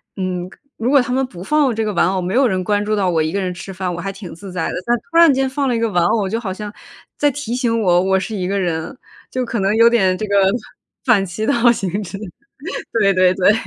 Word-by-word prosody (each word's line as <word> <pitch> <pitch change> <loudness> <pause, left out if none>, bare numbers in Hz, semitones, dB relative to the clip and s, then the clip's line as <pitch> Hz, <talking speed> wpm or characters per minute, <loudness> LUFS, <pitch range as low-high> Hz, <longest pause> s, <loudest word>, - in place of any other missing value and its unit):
嗯， 185 -2 -3 0.3
如 235 +4 0
果 280 -2 +6
他 245 - -4
们 265 +1 +1
不 180 -9 -11
放 285 0 +2
这 225 - -1
个 215 - -1
玩 170 - +3
偶， 190 0 -1
没 180 +4 -2
有 265 0 +4
人 185 -4 -1
关 205 +2 0
注 215 0 0
到 195 -3 +1
我 165 -3 +1
一 155 - -2
个 200 +2 -1
人 185 -1 -2
吃 195 +2 -8
饭， 185 0 -3
我 175 - -5
还 195 +2 -4
挺 195 -2 -9
自 195 +2 -10
在 180 -3 -2
的。 - - -4
但 240 - +2
突 330 - 0
然 335 -4 +7
间 265 0 0
放 275 +1 -1
了 245 - +1
一 - - 0
个 230 0 +1
玩 175 -4 +1
偶， 200 +1 +1
就 225 +3 -1
好 200 -5 -4
像 210 +1 -7 0.5
在 290 -1 +2
提 280 -4 -4
醒 235 -3 0
我， 175 -4 +4
我 190 0 +2
是 215 +3 -5
一 185 -3 -2
个 200 +1 -1
人， 170 +5 -2 0.4
就 255 - -1
可 235 -2 -3
能 195 +2 +1
有 230 +1 +7
点 190 -6 +2
这 215 +3 -4
个 200 - 0 0.7
反 220 -7 +3
其 190 +4 -5
道 - - +3
而 240 - +7
行 195 -5 -3
之。 190 +1 -7 0.7
对 200 -3 +3
对 185 -1 +4
对。 195 +2 +4
205 Hz, 295 characters per minute, -19 LUFS, 185-235 Hz, 0.7 s, 然